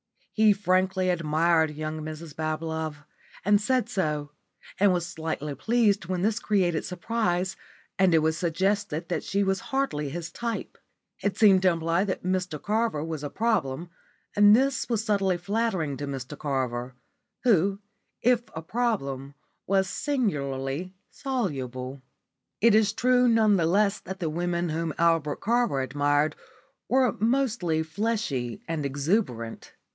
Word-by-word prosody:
He 215 -1 +5
frankly 185 -1 +1
admired 160 -1 +2
young 155 +1 -4
Mrs 155 0 -7
Bablove, 155 -1 -3 0.4
and 205 +1 +4
said 255 +2 +1
so, 150 -6 -2 0.5
and 200 0 +5
was 175 -2 0
slightly 160 -3 -4
pleased 210 -1 +1
when 180 -1 -1
this 220 +2 +1
created 180 -8 +1
surprise 185 -1 -1 0.4
and 185 -3 +5
it - - +6
was 160 0 +1
suggested 180 0 -1
that 175 - -1
she 200 +1 0
was 195 -1 +1
hardly 225 - -2
his 170 +3 -5
type. 235 +2 -4 0.4
It 200 -1 -1
seemed 200 -4 +6
to 190 - +5
imply 165 +1 +1
that 190 - -3
Mr 180 -4 -1
Carver 215 -6 0
was 160 -2 -5
a 145 - -3
problem, 170 - -1 0.4
and 205 +1 +7
this 265 +2 +1
was 225 -3 0
subtly 195 -4 +1
flattering 185 -5 -1
to 145 - -5
Mr 135 0 -5
Carver 130 -4 -2 0.5
who, 200 -4 +3 0.4
if 245 -1 +4
a 160 - -5
problem, 145 - -2 0.3
was 195 0 +2
singularly 170 - -2 0.2
soluble. 135 - -3 0.6
It 230 0 +5
is 215 -1 +4
true 250 +1 +3
none 220 -3 +4
the 165 -2 +2
less 200 +3 +2
that 190 +1 -8
the 165 -3 -2
women 175 +1 -1
whom 160 -1 -2
Albert 165 -3 +2
Carver 235 - +1
admired 145 +3 +1 0.5
were 255 -2 +4
mostly 220 -9 +1
fleshy 160 - -2
and 165 -3 -2
exuberant. 140 - -2
175 Hz, 140 wpm, -27 LUFS, 155-210 Hz, 0.6 s, and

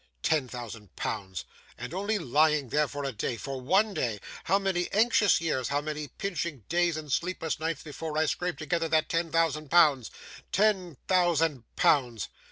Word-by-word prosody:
'Ten 150 -5 +2
thousand 115 -4 -9
pounds! 95 -5 -4 0.3
And 125 +6 -7
only 205 +4 0
lying 150 - +2
there 150 +3 +2
for 145 0 -5
a 135 - -2
day 115 +1 -3
for 135 0 -5
one 195 +10 +2
day! 115 - -1 0.3
How 190 +3 +4
many 190 -3 -1
anxious 215 -1 +4
years, 150 -7 -1
how 145 - +1
many 150 0 -4
pinching 170 - -4
days 175 -1 +2
and 150 -2 -7
sleepless 170 -2 -1
nights, 160 -1 -2
before 155 +1 -5
I 160 - +3
scraped 175 +1 -2
together 165 +2 -1
that 155 -1 +2
ten 165 -1 0
thousand 155 -3 +1
pounds! 145 -8 +5 0.4
Ten 190 -7 +1
thousand 165 -8 +2
pounds! 125 -7 +2
155 Hz, 170 wpm, -28 LUFS, 135-175 Hz, 0.4 s, pounds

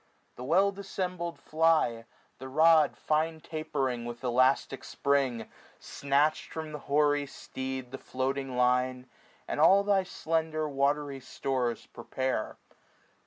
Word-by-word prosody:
The 125 - -8
well 185 +9 +3
dissembled 185 -3 -4
fly. 155 -8 +1 0.3
The 130 - -7
rod 155 +2 +4
fine 160 +1 0
tapering 145 -7 -3
with 120 +1 -7
elastic 130 +1 +2
spring. 135 -5 0 0.3
Snatched 140 +2 0
from 160 -1 -5
the 150 - -6
hoary 145 0 +2
steed 130 -2 -6
the 135 - -7
floating 130 0 -3
line. 125 +1 +1 0.4
And - - -3
all 195 +6 +6
thy 200 -1 +3
slender 160 -3 -2
watry 140 0 0
stores 125 -3 -2
prepare. 130 -1 -3
140 Hz, 120 wpm, -29 LUFS, 130-160 Hz, 0.4 s, all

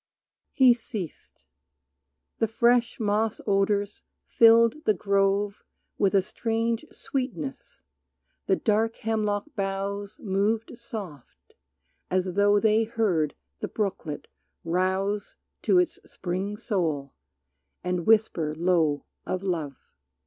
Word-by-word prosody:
He 255 -2 +6
ceased; 200 - -8 0.9
the 225 - +2
fresh 235 +2 +2
moss 215 +1 0
odors 200 0 +1 0.2
filled 230 +5 +5
the 215 - +3
grove 200 +1 +1 0.4
With 200 0 +3
a 195 - +4
strange 225 +3 -1
sweetness, 205 - -5 0.6
the 190 - +4
dark 225 +2 +1
hemlock 215 +4 -1
boughs 200 0 -3
Moved 215 +3 0
soft, 200 - -9 0.6
as 185 0 0
though 205 +1 +4
they 220 +1 +3
heard 200 -10 0 0.2
the - - -3
brooklet 190 -8 -3 0.4
rouse 190 +4 -1 0.3
To - - +3
its 360 -2 +2
spring 190 +3 -4
soul, 165 - -2 0.7
and 180 -2 -2
whisper 195 -9 +3
low 160 -4 +1 0.2
of 185 +1 -2
love. 160 -7 -2
205 Hz, 105 wpm, -26 LUFS, 185-225 Hz, 0.9 s, He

